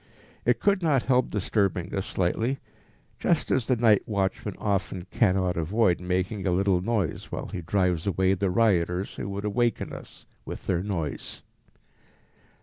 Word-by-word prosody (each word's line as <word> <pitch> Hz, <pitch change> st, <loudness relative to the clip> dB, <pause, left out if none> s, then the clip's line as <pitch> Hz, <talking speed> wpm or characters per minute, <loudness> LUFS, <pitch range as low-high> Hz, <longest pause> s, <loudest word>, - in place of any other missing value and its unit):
It -, -, +3 dB
could 200 Hz, -2 st, +2 dB
not 145 Hz, -7 st, +2 dB
help 130 Hz, -1 st, +2 dB
disturbing 95 Hz, -3 st, 0 dB
us 95 Hz, -1 st, -2 dB
slightly, 110 Hz, +9 st, 0 dB, 0.6 s
just -, -, +1 dB
as 130 Hz, -4 st, +1 dB
the 130 Hz, -, +3 dB
night 110 Hz, -3 st, +4 dB
watchman 100 Hz, -1 st, -1 dB
often 95 Hz, -3 st, -2 dB
cannot 95 Hz, -5 st, +2 dB
avoid 90 Hz, +2 st, +2 dB
making 95 Hz, +3 st, -1 dB
a -, -, +2 dB
little 95 Hz, 0 st, +2 dB
noise 100 Hz, -4 st, -2 dB
while -, -, -4 dB
he 90 Hz, -, -5 dB
drives 90 Hz, 0 st, 0 dB
away 95 Hz, 0 st, +2 dB
the 100 Hz, 0 st, 0 dB
rioters 90 Hz, -3 st, +1 dB
who 100 Hz, -, -4 dB
would 100 Hz, +1 st, -4 dB
awaken 115 Hz, +2 st, 0 dB
us -, -, -11 dB, 0.2 s
with -, -, -8 dB
their 90 Hz, -2 st, +1 dB
noise. 85 Hz, -7 st, -4 dB
95 Hz, 150 wpm, -27 LUFS, 90-110 Hz, 0.6 s, night